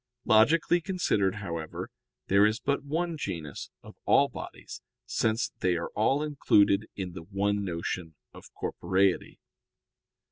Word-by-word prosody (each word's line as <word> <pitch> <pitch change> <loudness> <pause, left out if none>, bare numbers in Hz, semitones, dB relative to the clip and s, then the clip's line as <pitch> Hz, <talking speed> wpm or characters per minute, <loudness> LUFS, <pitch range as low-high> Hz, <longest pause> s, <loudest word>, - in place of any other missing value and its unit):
Logically 155 +10 +4
considered, 160 - 0
however, 85 -6 -5 0.3
there 100 +1 +4
is 110 +2 +3
but 140 0 -1
one 165 +4 -2
genus 80 - -5
of - - -13
all - - +5
bodies, - - -9 0.2
since 110 +1 0
they 90 -1 +2
are 85 - -4
all 135 +8 +2
included 110 -8 +3
in 95 -2 -4
the 85 - -8
one 100 +3 -1
notion 85 -2 -4 0.2
of - - -14
corporeity. 95 0 0
100 Hz, 130 wpm, -28 LUFS, 90-140 Hz, 0.3 s, all